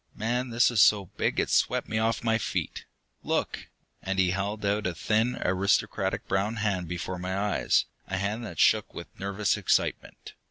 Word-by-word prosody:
Man 120 +4 -1
this 120 +1 +3
is 110 -5 +3
so 100 -2 +5
big - - 0
it's - - 0
swept - - +2
me 110 - -1
off 115 +1 0
my 115 -1 +2
feet! - - -3 0.4
Look!" - - -2 0.3
And 95 0 -3
he 95 -2 +3
held 100 +2 -3
out 105 +1 +1
a 90 - -3
thin, 110 +8 +1
aristocratic 95 +2 0
brown 100 +4 0
hand 100 -5 -1
before 90 +1 -4
my 95 +2 -3
eyes, 105 0 +1 0.2
a 95 - -2
hand 105 +5 -2
that 110 - -8
shook 110 -1 +3
with 85 - -10
nervous 100 +1 0
excitement. - - -1
100 Hz, 175 wpm, -27 LUFS, 95-110 Hz, 0.4 s, so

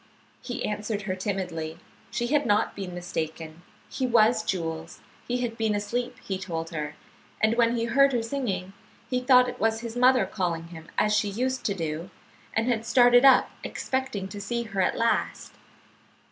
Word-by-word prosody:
He 245 - -4
answered 210 0 -3
her 185 -2 -2
timidly. 180 -5 -3 0.3
She 240 0 -2
had 290 +4 +2
not 205 0 +2
been 185 -3 -6
mistaken; 165 -2 -5 0.3
he 260 -1 -2
was 230 -1 +4
Jules; 165 -4 -4 0.3
he 245 0 -1
had 230 -1 -4
been 220 -2 +1
asleep, 240 +5 -2
he 190 -1 -3
told 165 -4 -4
her, 150 -2 -4 0.4
and 220 +1 +3
when 235 0 +3
he 230 -1 0
heard 275 +3 +4
her 240 -3 0
singing, 225 -7 -3 0.4
he 250 - +2
thought 250 0 +5
it 250 - -6
was 225 +1 +1
his 230 -1 -6
mother 255 +1 +5
calling 170 -4 -3
him 165 -1 -11
as 210 0 +3
she 210 - +1
used 255 +5 -2
to 200 - 0
do, 165 0 -4 0.5
and 225 +2 +1
had 230 -3 +1
started 245 +1 +5
up 265 -2 +6
expecting 260 -7 -3
to 205 +1 -7
see 235 +4 -2
her 200 -4 -2
at - - +1
last. 230 0 0
215 Hz, 175 wpm, -26 LUFS, 185-245 Hz, 0.5 s, up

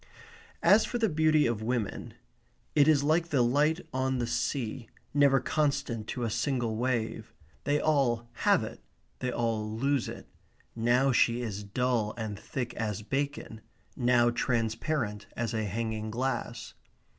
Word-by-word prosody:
As 215 +2 +6
for 245 - -2
the 225 -2 +2
beauty 155 -1 +3
of 115 -2 -1
women, 115 -3 -3 0.6
it 145 -1 +5
is 150 -3 +4
like 160 +3 +2
the 135 -6 +3
light 150 +7 +2
on 130 0 0
the 120 - 0
sea, 115 -1 -2 0.2
never 140 -1 +5
constant 140 -5 -1
to 125 - -3
a 115 - 0
single 120 -1 -1
wave. 115 -2 -2 0.3
They 145 +1 +2
all 125 -7 +1
have - - +3
it; - - -8 0.4
they 125 - -1
all 110 -3 -1
lose 135 +3 0
it. - - -9 0.5
Now 120 +4 +3
she 120 0 +3
is 105 -3 -4
dull 115 +1 0
and 110 -3 -4
thick 120 -2 -4
as 105 -1 -3
bacon; 135 -3 -3 0.3
now 120 -1 +3
transparent 115 -2 -1
as 115 0 -2
a 110 -1 -1
hanging 110 +1 -3
glass. 120 - -3
120 Hz, 145 wpm, -29 LUFS, 110-140 Hz, 0.6 s, As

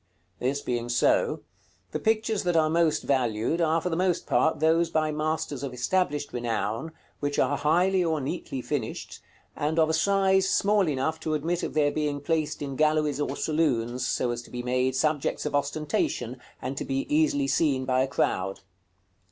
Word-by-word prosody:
§ - - -8
CXXXVI. 125 - +3
This 140 +1 -2
being 120 -1 -2
so, 120 - +2 0.5
the - - -2
pictures 220 -1 +1
that 175 -2 0
are 155 -1 +3
most 165 -2 +2
valued 125 +4 0
are 165 0 +3
for 180 - -2
the 165 - -1
most 180 0 0
part 160 -1 +2
those 165 +2 +3
by 155 -1 +1
masters 155 -2 -2
of 135 -3 -5
established 145 +1 0
renown, 115 +4 -2 0.3
which 145 0 -2
are 145 - +2
highly 180 +6 +2
or 160 -2 0
neatly 135 -2 -4
finished, 125 -3 -4 0.3
and 150 +2 -1
of 160 -1 +4
a - - +1
size 190 +2 +3
small 200 -2 +3
enough 150 +3 -1
to 160 -1 -1
admit 165 +4 -1
of - - -4
their 145 -1 +3
being 150 -2 -1
placed 155 0 -1
in 135 -1 -4
galleries 150 -1 +2
or - - -2
saloons, 130 -6 0
so 125 0 0
as 120 0 -4
to - - -15
be 125 0 -5
made 125 +1 0
subjects 150 +1 0
of 150 - -2
ostentation, 145 -4 -1 0.3
and 130 +2 -4
to - - -2
be 135 0 -2
easily 150 -2 +2
seen 135 -1 +1
by 130 0 +2
a 130 - +1
crowd. 95 -8 -1
150 Hz, 185 wpm, -27 LUFS, 130-160 Hz, 0.5 s, of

